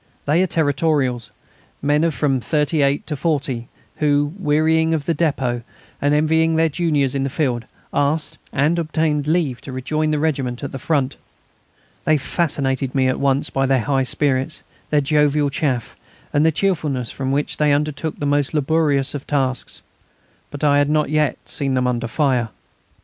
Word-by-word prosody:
They 155 +5 +3
are 185 - +2
Territorials, 145 -6 0 0.5
men 145 +2 +2
of 165 -3 +1
from 135 -3 +1
thirty 150 +3 0
eight 140 +1 +1
to 150 - -3
forty, 135 -6 -1 0.3
who, 145 0 +1
wearying 160 0 +2
of 145 -3 -3
the 170 - +1
depôt 135 -7 0 0.4
and 145 +1 +3
envying 160 +2 +2
their 165 0 +3
juniors 150 -5 0
in 140 - -1
the 135 - -1
field, 125 -5 -1 0.3
asked 145 +2 0
and 150 +5 +1
obtained 155 -2 0
leave 155 -7 0
to 135 - -8
rejoin 155 +4 -1
the 155 - +1
regiment 140 -5 -1
at 140 - -4
the 135 - -6
Front. 140 -1 0 0.9
They 155 - +3
fascinated 140 -3 -1
me 130 -1 +3
at 130 - -1
once 140 0 +1
by 135 0 +1
their 135 -2 +2
high 135 +3 +1
spirits, 130 +2 -1 0.3
their 150 -1 +3
jovial 150 0 +2
chaff, 130 -6 -2 0.4
and 145 - +3
the 160 - +4
cheerfulness 150 - -1
with 130 -1 -1
which 140 +2 -1
they 150 -1 +3
undertook 150 +2 -1
the 145 - -3
most 145 +1 +1
laborious 145 -2 +1
tasks. 130 -3 -2 0.7
But 145 +1 -8
I 145 -1 +4
had 145 0 +2
not 150 0 +1
yet 150 -4 +1
seen 135 -3 -1
them 125 0 +1
under 120 -1 -1
fire. 125 -2 +1
145 Hz, 170 wpm, -20 LUFS, 135-155 Hz, 0.9 s, the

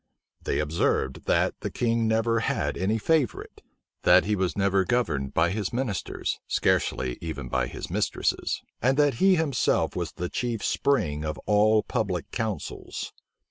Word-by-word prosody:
They - - 0
observed, 75 -3 0
that - - +2
the - - -3
king 115 -1 0
never 115 +1 +2
had 110 - -1
any 100 +5 0
favorite; 140 -1 0 0.4
that - - +6
he 105 +1 +1
was 95 -1 -1
never 100 -1 +3
governed 80 - -1
by 85 +2 +3
his 100 -1 -2
ministers, 120 -6 -2
scarcely 60 -2 0
even 80 -6 -5
by 65 -1 0
his - - -7
mistresses; - - -1 0.2
and 130 +3 +2
that 145 -2 +4
he 190 -1 +6
himself 155 -7 +1
was - - -3
the 90 - -3
chief 115 +2 -3
spring 75 - +1
of 75 -2 -3
all 105 +1 +4
public 100 -8 -2
counsels. 110 -4 -4
105 Hz, 150 wpm, -26 LUFS, 80-120 Hz, 0.4 s, that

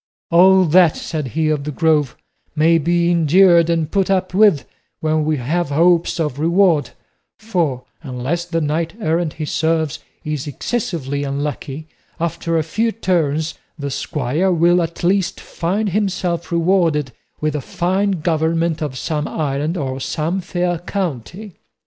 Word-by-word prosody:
"All 185 +2 +6
that," 170 0 +4
said 155 -4 -4
he 155 -1 +2
of 150 -2 0
the 150 - -4
Grove, 150 -4 +1 0.4
"may 165 +2 +4
be 170 +2 +1
endured 170 +1 +5
and 165 -2 0
put 195 -2 +1
up 185 -1 0
with 200 -7 +4 0.3
when 155 -1 0
we 155 -1 +1
have 150 +6 -1
hopes 170 +4 +2
of 150 -4 -2
reward; 165 -5 +3 0.5
for, 170 - -1 0.2
unless 135 +4 -3
the 165 -1 -2
knight 160 +4 -1
errant 165 -4 0
he 155 - -5
serves 160 -1 0 0.2
is 150 -2 -4
excessively 145 - -3
unlucky, 140 +1 -4 0.3
after 165 0 -1
a 160 - +1
few 225 +8 0
turns 160 -7 0 0.2
the 140 -2 -4
squire 150 +7 -1
will 175 +1 +3
at 170 +1 -5
least 185 +1 +1
find 200 +5 -2
himself 185 -3 -1
rewarded 170 -5 +1 0.3
with 155 0 -1
a 150 - -2
fine 185 +4 0
government 165 0 0
of 145 -4 -3
some 150 +2 -2
island 150 +3 -2
or 135 -4 -3
some 160 +7 -2
fair 175 -1 -2
county." 180 - -5
165 Hz, 145 wpm, -19 LUFS, 150-175 Hz, 0.5 s, All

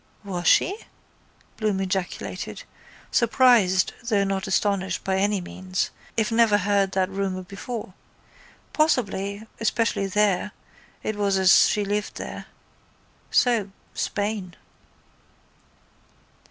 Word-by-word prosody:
—Was 180 -4 -3
she? 400 +4 +4 0.8
Bloom 210 -3 0
ejaculated, 190 -1 -3 0.5
surprised 230 -6 +4
though 220 -4 +1
not 195 +1 -2
astonished 190 -1 0
by 190 0 0
any 200 +1 +1
means, 185 +1 -3 0.3
I 220 - +3
never 225 -2 +4
heard 200 -1 +1
that 190 -1 +2
rumour 190 -1 -2
before. 200 +2 -7 0.8
Possible, 205 -9 0 0.2
especially 225 -3 0
there, 205 0 +1 0.5
it 215 - -2
was 200 -1 +1
as 190 -1 +6
she 210 -1 0
lived 205 +1 -2
there. - - -7 0.8
So, 230 -5 +2 0.2
Spain. 205 -4 -3
200 Hz, 100 wpm, -24 LUFS, 190-215 Hz, 0.8 s, as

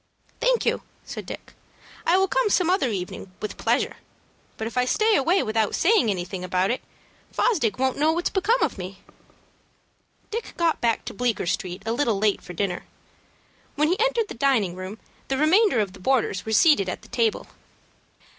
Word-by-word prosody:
"Thank - - +2
you," - - +1 0.2
said - - -7
Dick. - - -8 0.5
"I 345 +3 +5
will 385 0 +3
come - - +1
some 360 -3 +3
other 370 -9 +2
evening 185 -2 -5
with 210 - -5
pleasure; - - 0 0.6
but 220 - -3
if 230 - -6
I 250 - +3
stay 430 - +2
away 340 +8 +3
without 220 -1 0
saying 390 - +3
anything 185 -1 -3
about 185 +2 +1
it, 255 - -2 0.5
Fosdick 240 - +1
won't 265 +1 0
know 310 +2 +4
what's 345 +2 -1
become 445 +6 +2
of - - -1
me." 185 +1 -8 1.3
Dick 455 +2 -5
got 335 -2 +1
back 230 -2 +1
to - - -6
Bleecker 240 -2 -1
Street 180 +2 -3
a 225 - 0
little 235 -4 +1
late 205 0 +1
for 180 - -9
dinner. 180 0 -2 0.9
When 300 +1 +2
he 365 +5 +1
entered 470 -2 +2
the - - -7
dining 235 -8 +2
room, 185 +3 -7 0.3
the 270 - -1
remainder 350 - +4
of 200 -3 -1
the 195 - -13
boarders 220 -3 0
were - - -2
seated 220 - +5
at - - -5
the - - -14
table. 230 -3 0
245 Hz, 185 wpm, -24 LUFS, -, 1.3 s, I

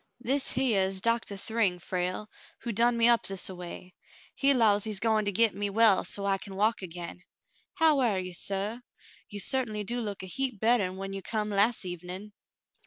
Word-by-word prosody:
"This 265 +3 0
hyar 230 -8 +2
is 190 0 -5
Doctah 230 -1 0
Thryng, 205 -3 0
Frale, 180 +3 -3 0.3
who 235 - -3
done 235 +2 +2
me 230 0 +5
up 235 -1 +4
this 195 -1 +1
a - - -6
way. 180 +1 -9 0.4
He 280 0 +2
'lows 215 -6 +4
he's 215 -3 -2
goin' 220 -1 +1
to 205 - 0
git 225 +2 +3
me 205 0 -2
well 220 -1 +4
so's 200 - -2
I 195 -1 +1
can 195 -1 -9
walk 215 +3 +1
again. 175 -1 -7 0.5
How 315 -3 +4
air 225 -6 +2
you, 185 -1 -5
suh? 200 +6 -2 0.5
You 205 - -6
certainly 215 -1 0
do 240 +4 -3
look 205 -4 -5
a - - -4
heap 255 +2 -2
better 225 -1 +3
'n 185 +1 -6
when 195 0 -6
you 195 - -5
come 210 +1 -3
las' 205 +2 +2
evenin'." 180 +4 -7
205 Hz, 200 wpm, -28 LUFS, 190-230 Hz, 0.5 s, me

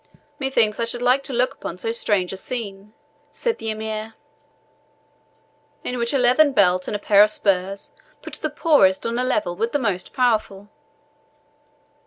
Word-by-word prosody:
"Methinks 235 -6 +1
I 230 - +1
should 240 +1 -3
like 250 +2 +3
to - - -4
look 250 +1 +1
upon 175 - -7
so 225 +5 -3
strange 200 -5 0
a - - -6
scene," 205 -1 -6 0.4
said 470 -2 -2
the 225 - -4
Emir, 220 0 -5 1.7
"in 250 0 -3
which 235 0 +1
a 275 - +2
leathern 265 +4 +4
belt 185 -4 +3
and - - -3
a - - -2
pair 205 0 +5
of 210 - +6
spurs 195 -1 -1 0.3
put - - -9
the - - -3
poorest 195 - +3
on 230 +1 -1
a - - +1
level 210 -8 -1
with 225 +5 -2
the - - +3
most 200 -9 -2
powerful." 215 -5 0
220 Hz, 170 wpm, -22 LUFS, 200-250 Hz, 1.7 s, of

